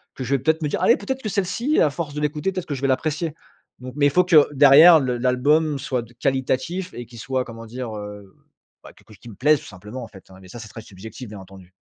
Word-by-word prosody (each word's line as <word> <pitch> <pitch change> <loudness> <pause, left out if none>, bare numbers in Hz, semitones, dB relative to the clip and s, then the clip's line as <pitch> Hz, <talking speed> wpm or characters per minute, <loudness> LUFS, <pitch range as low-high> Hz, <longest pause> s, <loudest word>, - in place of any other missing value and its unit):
que 130 - -6
je 135 +3 0
vais - - 0
peut 135 +6 +3
être 160 +1 -9
me - - 0
dire: - - -2
«Allez, 235 - +5
peut 200 - -11
être 265 0 -2
que 215 - -3
celle 195 -1 -1
ci, 260 +10 0
à 150 - +4
force 150 -1 -5
de 150 - -3
l'écouter, 150 +5 -1
peut 185 - -4
être - - -15
que 145 - -3
je 135 - -8
vais - - +2
l'apprécier». 155 +4 -1 0.5
Donc 125 0 -9
mais 145 - +3
il - - +3
faut 180 +6 +4
que 165 -5 +5
derrière 145 +4 +8
le 125 -2 -2
l'album 140 +5 +1
soit 130 -2 -2
de 120 +1 -15
qualitatif 130 +9 -2
et 120 - -8
qui 120 +1 -15
soit, 130 +3 -2
comment 115 -1 -10
dire, 120 0 -7
heu? 105 -2 -10 0.5
Bah, - - -13
que - - -23
qu'il 115 - -13
me - - -13
plaise, 150 +5 +3
tout - - -15
simplement, 105 +6 -9
en - - -8
fait, 95 -3 -17
mais 95 - -15
ça 120 - -10
c'est 110 - -9
très 125 - -10
subjectif, 110 +5 -11
bien 105 -1 -9
entendu. 95 -1 -15
130 Hz, 285 wpm, -22 LUFS, 115-155 Hz, 0.5 s, derrière